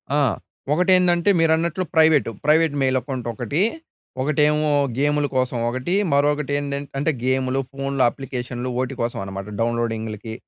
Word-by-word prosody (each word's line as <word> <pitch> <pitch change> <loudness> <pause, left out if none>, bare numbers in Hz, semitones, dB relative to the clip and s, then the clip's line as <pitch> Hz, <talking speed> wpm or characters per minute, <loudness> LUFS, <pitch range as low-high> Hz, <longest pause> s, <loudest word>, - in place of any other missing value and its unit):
ఆ! - - +3 0.5
ఒకటి 180 +3 +2
ఏందంటే 175 0 +3
మీరన్నట్లు 165 +2 +2
ప్రైవేట్. 160 -2 +5 0.2
ప్రైవేట్ 155 0 +4
మెయిల్ 130 -1 +2
అకౌంట్ 130 -3 -5
ఒకటి. 130 - -2 0.6
ఒకటేమో 150 +1 +2 0.3
గేములు 145 +1 +1
కోసం 130 -1 0
ఒకటి. 130 +9 -2 0.2
మరొకటి 145 0 +1
ఏందంటే 140 0 -4
అంటే 145 +3 +1
గేములు, 130 0 +1
ఫోన్‌లు 135 -1 -1
అప్లికేషన్లు 125 -2 -5
ఓటి 130 +1 -3
కోసం 115 0 -2
అనమాట 95 +1 -6
డౌన్లోడింగ్‌లకి 115 -2 -2
140 Hz, 130 wpm, -22 LUFS, 125-150 Hz, 0.6 s, ప్రైవేట్